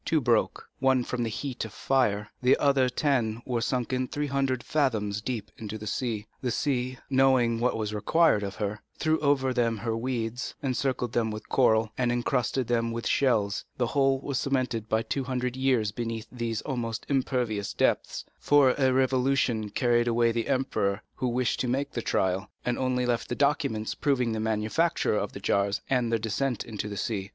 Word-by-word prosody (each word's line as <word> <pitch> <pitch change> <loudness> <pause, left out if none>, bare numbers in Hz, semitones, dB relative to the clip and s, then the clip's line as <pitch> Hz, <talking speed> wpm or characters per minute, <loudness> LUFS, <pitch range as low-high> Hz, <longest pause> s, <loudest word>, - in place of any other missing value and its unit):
Two 160 - +2
broke, 120 -4 +1
from 130 -2 +1
the 115 - 0
heat 130 +3 -4
of 110 - -5
the - - -16
fire; 105 -6 +1
the 125 +1 +4
other 135 -3 +3
ten 125 -5 0
were 120 -2 -1
sunk 125 +1 -1 0.2
three 145 0 -1
hundred 135 -3 0
fathoms 110 -9 0
deep 110 -3 -4
into 110 -1 -5
the 105 - -8
sea. 110 -2 -2 0.2
The 125 - -1
sea, 130 0 -1
knowing 130 -4 +3
what 125 0 +1
was 105 -1 -3
required 110 +4 +3
of 100 -1 -4
her, 105 0 -3 0.2
threw 160 +1 +1
over 135 -3 +2
them 115 -2 +1
her 115 +1 -2
weeds, 120 0 -3
encircled 130 -2 -1
them 115 -2 +1
with 110 0 -7
coral, 110 -4 +3
and 125 -1 +2
encrusted 125 +1 0
them 115 0 0
with 115 0 -4
shells; 110 -6 +1
the 125 - +1
whole 135 +1 +2
was 140 -2 -2
cemented 125 -5 -1
by 110 +1 +1
two 135 +2 -2
hundred 125 -1 -2
years 130 -5 +1
beneath 115 0 -4
these 115 -3 -3
almost 115 -5 -3
impervious 125 -7 0
depths, - - 0
for 145 -3 +5
a 130 -1 +4
revolution 130 -4 +1
carried 120 +1 +2
away 115 0 +3
the 115 0 -2
emperor 110 -7 0
who 130 - -2
wished 125 0 0
to 125 - 0
make 135 +4 -1
the 120 - -3
trial, 95 -1 0 0.2
and 125 -1 0
only 130 -1 0
left 120 -1 -1
the 120 - -1
documents 140 -7 0
proving 130 -5 +1
the 110 - -2
manufacture 110 +8 +1
of 105 -1 -2
the - - -7
jars 100 +1 +1
and 125 -3 +2
their 115 - +3
descent 115 +2 -1
into 105 -2 -5
the 100 - -6
sea. 100 -2 -2
120 Hz, 185 wpm, -27 LUFS, 110-130 Hz, 0.2 s, for